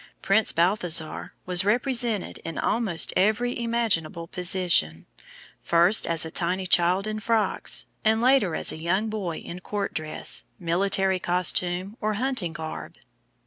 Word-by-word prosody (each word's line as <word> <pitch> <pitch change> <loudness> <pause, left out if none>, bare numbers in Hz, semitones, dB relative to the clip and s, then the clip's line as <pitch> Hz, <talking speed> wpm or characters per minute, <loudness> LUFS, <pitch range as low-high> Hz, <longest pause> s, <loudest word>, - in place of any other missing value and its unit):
Prince 215 +2 +3
Balthasar 170 -2 +2
was 180 0 +3
represented 235 -1 0
in 165 - -8
almost 210 -8 -1
every 220 +6 0
imaginable 215 -9 -1
position, 175 - +1 0.6
first 170 +5 +3
as 165 -1 -1
a 160 - -7
tiny 185 +3 -2
child 180 +2 +2
in 215 0 -4
frocks, 220 0 0 0.2
and 220 0 +2
later 245 -8 +2
as - - +2
a - - -8
young 190 +6 -1
boy 190 -7 -4
in 175 - -9
court 200 +2 -5
dress, 155 -1 -1
military 190 +2 0
costume, 180 +3 0
or 215 -1 -1
hunting 245 -7 -1
garb. 160 -1 -8
185 Hz, 135 wpm, -24 LUFS, 170-215 Hz, 0.6 s, Prince